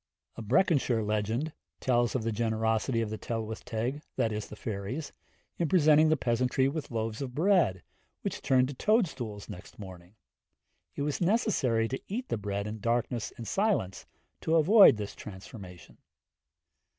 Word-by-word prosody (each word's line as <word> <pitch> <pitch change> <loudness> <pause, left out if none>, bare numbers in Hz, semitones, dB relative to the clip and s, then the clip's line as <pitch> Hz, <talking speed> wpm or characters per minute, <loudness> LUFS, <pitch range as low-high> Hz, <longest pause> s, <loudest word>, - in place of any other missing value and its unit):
A - - -7
Breconshire 125 - +2
legend 110 +8 -1 0.3
tells 120 -2 +1
of 125 - 0
the 115 - -1
generosity 110 +2 0
of 110 -2 -3
the 110 - -5
Tylwyth 110 -1 -4
Teg 120 +6 -3 0.2
in 110 - -4
presenting 155 -2 +5
the 155 - +3
peasantry 125 +1 +1
with 150 +1 -4
loaves 115 0 -3
of 130 -2 -5
bread, 165 - +2 0.4
which - - -3
turned 130 -1 +3
to - - -5
toadstools 130 - 0
next 95 -4 -10
morning; 95 -1 -11 0.8
it - - -2
was 145 +3 -2
necessary 170 - +2
to 130 +3 -4
eat 245 +6 -4
the - - 0
bread 100 0 -3
in 110 +1 -5
darkness 115 0 -1
and 115 - -7
silence 195 - 0 0.3
to 160 - 0
avoid 185 - +7
this 105 -1 -5
transformation. 95 -3 -11
120 Hz, 140 wpm, -29 LUFS, 110-150 Hz, 0.8 s, avoid